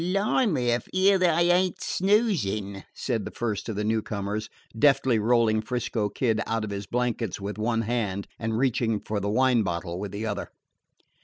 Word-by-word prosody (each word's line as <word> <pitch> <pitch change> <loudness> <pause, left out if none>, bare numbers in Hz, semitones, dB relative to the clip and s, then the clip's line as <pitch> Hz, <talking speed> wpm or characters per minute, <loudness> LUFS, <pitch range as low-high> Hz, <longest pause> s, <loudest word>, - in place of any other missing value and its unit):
"Bli' 200 +8 +1
me, 125 - +1
if 120 - -1
'ere 190 +1 +4
they 180 -1 +4 0.2
ain't 180 0 +2
snoozin'," 150 - 0
said 115 -5 -2
the - - -5
first 110 -2 -3
of 110 - -3
the 105 - -1
newcomers, 105 -1 -2 0.3
deftly 135 -4 +4
rolling 110 -1 +3
'Frisco 115 -3 -2
Kid 115 0 0
out 115 -1 -1
of 105 - -4
his 100 -1 -5
blankets 120 -4 -1
with 100 +2 -5
one 115 +1 0
hand 105 -4 -2
and 115 -1 -1
reaching 115 -4 +1
for 105 +1 -3
the 100 +1 -2
wine 125 +1 +3
bottle 85 -2 -3
with 100 -1 -5
the 105 +2 -4
other. 105 -2 -3
115 Hz, 175 wpm, -26 LUFS, 105-130 Hz, 0.3 s, ere